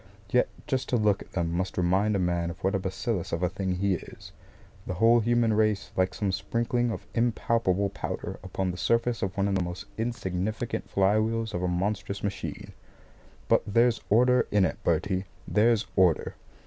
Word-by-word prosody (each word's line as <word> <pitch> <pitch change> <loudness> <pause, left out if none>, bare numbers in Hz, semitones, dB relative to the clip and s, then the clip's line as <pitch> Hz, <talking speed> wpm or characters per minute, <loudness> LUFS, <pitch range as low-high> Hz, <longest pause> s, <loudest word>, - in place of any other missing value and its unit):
Yet 125 - +3 0.2
just 130 -2 -2
to - - +1
look 105 -3 +2
at - - -13
them 85 -2 -1
must 90 +2 -2
remind 95 +4 +2
a - - +2
man 85 -2 0
of 85 - -9
what 95 +2 +2
a 95 - +1
bacillus 95 0 -3
of 85 +2 -1
a 90 - +2
thing 95 0 -2
he 100 +1 +1
is - - -8 0.6
the 90 - -3
whole 115 +4 +5
human 115 0 +2
race 105 -1 +1
like 95 0 +1
some 100 -2 -1
sprinkling 120 +5 0
of 115 - -5
impalpable 115 -4 +1
powder - - -5
upon 95 0 -2
the 90 - -7
surface 115 +3 +1
of 95 0 -3
one 100 0 +2
of 100 - 0
the 95 - +1
most 90 +3 -5
insignificant 110 -1 -3
fly 100 +2 +3
wheels 110 0 -1
of 90 - -2
a 90 - 0
monstrous 100 +2 -2
machine. 100 -1 -4 0.8
But - - +4
there's 115 +2 +3
order 125 +4 +4
in 105 -2 +3
it, - - -4
Bertie, 95 +3 0 0.2
there's 110 0 +3
order! 90 -4 +3
100 Hz, 185 wpm, -27 LUFS, 95-115 Hz, 0.8 s, whole